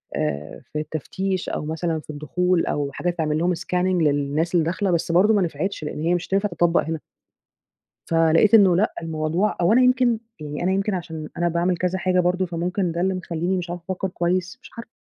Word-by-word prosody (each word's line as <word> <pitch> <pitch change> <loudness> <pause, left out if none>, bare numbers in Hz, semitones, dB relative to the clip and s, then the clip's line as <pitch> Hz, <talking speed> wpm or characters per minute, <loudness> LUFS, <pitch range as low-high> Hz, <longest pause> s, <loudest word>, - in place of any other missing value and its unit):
آآ 75 +1 -3
في 150 - -1
التفتيش 185 +5 -3
أو - - -3
مثلًا 160 +1 -2
في 155 - -17
الدخول 170 +4 0
أو 145 -1 -1
حاجة 175 - -2
تعمل 155 -3 -1
لهم 175 +2 +1
scanning 180 - -8 0.3
للناس 150 +3 +1
اللي 165 -2 +3
داخلة، 185 +2 0
بس 170 0 0
برضه 200 +6 +5
ما 205 - +3
نفعتش 180 0 -2
لإن 150 - -5
هي 170 +2 +1
مش 175 - -3
هتنفع 200 +2 +1
تتطبق 175 -1 +2
هنا. 160 0 -3 1.1
فلقيت 165 +6 +4
إنّه 195 -5 +7
لأ 210 +5 +2
الموضوع 160 +5 -1
أو 175 +5 +4
أنا 255 - +5
يمكن 250 -2 +3 0.2
يعني 150 +1 -5
أنا 185 +1 +1
يمكن 195 +1 0
علشان 160 -4 -5
أنا 175 0 +1
باعمل 175 +2 +1
كذا 180 +2 -1
حاجة 185 0 +2
برضه، 180 +1 +1
فممكن 175 +1 -2
ده 170 - -3
اللي 190 +1 +1
مخلّيني 180 +1 -2
مش 175 -1 -4
عارفة 175 -1 -6
أفكّر 190 0 -2
كويس، 180 +5 -1
مش - - -13
عارفة. 230 0 -8
175 Hz, 205 wpm, -23 LUFS, 160-185 Hz, 1.1 s, إنّه